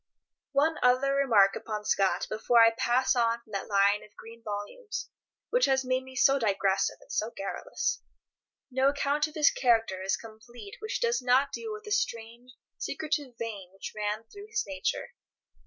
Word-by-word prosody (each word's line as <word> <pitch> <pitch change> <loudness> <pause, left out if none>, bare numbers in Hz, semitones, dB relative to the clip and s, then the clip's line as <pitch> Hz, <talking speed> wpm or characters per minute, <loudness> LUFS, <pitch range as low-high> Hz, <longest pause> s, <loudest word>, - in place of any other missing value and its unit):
One 310 +4 +2
other 255 +2 +3
remark 225 -8 +4
upon 210 -2 -5
Scott 195 -2 +2
before 230 +2 +2
I 230 0 +8
pass 250 +3 +1
on 235 -1 +2
from 220 - -21
that 195 -1 -4
line 200 0 +3
of 210 - -18
green 230 +1 -12
volumes 215 - -6 0.4
which - - +4
has 265 -1 +1
made 255 0 +1
me 260 0 -13
so 275 +2 +4
digressive 195 -3 +1
and - - -14
so 215 - -1
garrulous. 195 - -3 0.7
No 260 +1 +2
account 285 +1 0
of 310 - -14
his 300 -2 +5
character 225 -6 +2
is 190 +1 0
complete 220 -1 -12
which 435 +3 -4
does 470 - +1
not 260 +3 +3
deal 455 -1 -5
with 430 0 -7
the 420 - -9
strange, 235 - -2 0.3
secretive 290 -5 -3
vein 210 -6 -6
which 195 - -8
ran 210 +1 -2
through 405 - -12
his 430 -1 -1
nature. 290 +11 -3
240 Hz, 170 wpm, -29 LUFS, 215-280 Hz, 0.7 s, I